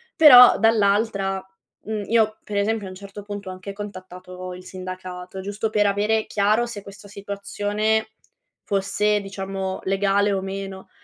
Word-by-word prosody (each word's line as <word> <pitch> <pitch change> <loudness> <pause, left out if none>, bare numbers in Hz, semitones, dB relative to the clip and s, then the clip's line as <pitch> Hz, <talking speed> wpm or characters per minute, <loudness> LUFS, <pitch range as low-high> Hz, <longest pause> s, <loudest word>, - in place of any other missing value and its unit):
Però 250 -8 +9
dall'altra, 200 -3 +2 0.4
mhmm, 215 -1 -3
io 220 -1 +2
per 205 -1 -4
esempio 210 0 0
a - - -7
un - - -10
certo 200 +1 -10
punto 205 -2 -7
ho - - -5
anche 190 +2 -8
contattato 185 -2 -8
il 180 0 -10
sindacato, 185 0 -8
giusto 205 +3 -3
per 210 -2 +3
avere 210 +2 +1
chiaro 215 +4 +1
se 205 -4 -7
questo 200 +1 -12
situazione 205 +2 -2 0.6
fosse 205 +1 +1
diciamo, 195 -1 -5
legale 200 +1 +1
o 190 - -1
meno. 195 0 -6
200 Hz, 145 wpm, -23 LUFS, 190-210 Hz, 0.6 s, Però